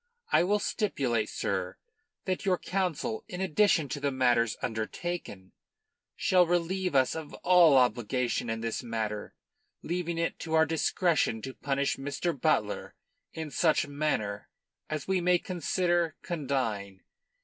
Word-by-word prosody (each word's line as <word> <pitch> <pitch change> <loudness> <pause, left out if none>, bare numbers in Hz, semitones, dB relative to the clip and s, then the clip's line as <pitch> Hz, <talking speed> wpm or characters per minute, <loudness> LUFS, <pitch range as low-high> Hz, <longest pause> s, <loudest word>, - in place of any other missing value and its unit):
I - - +5
will 205 +4 +2
stipulate, 135 - -1
sir, - - -2 0.5
that 185 -1 -1
your 185 -2 +2
Council, 190 +5 -2
in 180 - -6
addition 190 -3 +3
to 145 - -3
the 140 0 0
matters 120 -4 +2
undertaken, 110 - -4 0.6
shall 180 -2 +3
relieve 175 0 0
us 130 -2 +4
of 160 -2 -7
all 175 -6 +7
obligation 125 0 +1
in 115 0 -2
this 115 -1 -2
matter, 110 -3 -4 0.5
leaving 170 -1 -2
it 165 0 -1
to 160 -1 -2
our 160 0 +5
discretion 160 -4 +1
to 130 - -5
punish 140 +1 -1
Mr. 145 +5 -2
Butler 135 - 0 0.4
in 160 -2 -5
such 160 +1 +2
manner 140 -9 -2 0.4
as 155 -1 -4
we 190 -1 +1
may 180 +1 +4
consider 175 -1 0
condign. 120 - -2
155 Hz, 135 wpm, -29 LUFS, 125-175 Hz, 0.6 s, all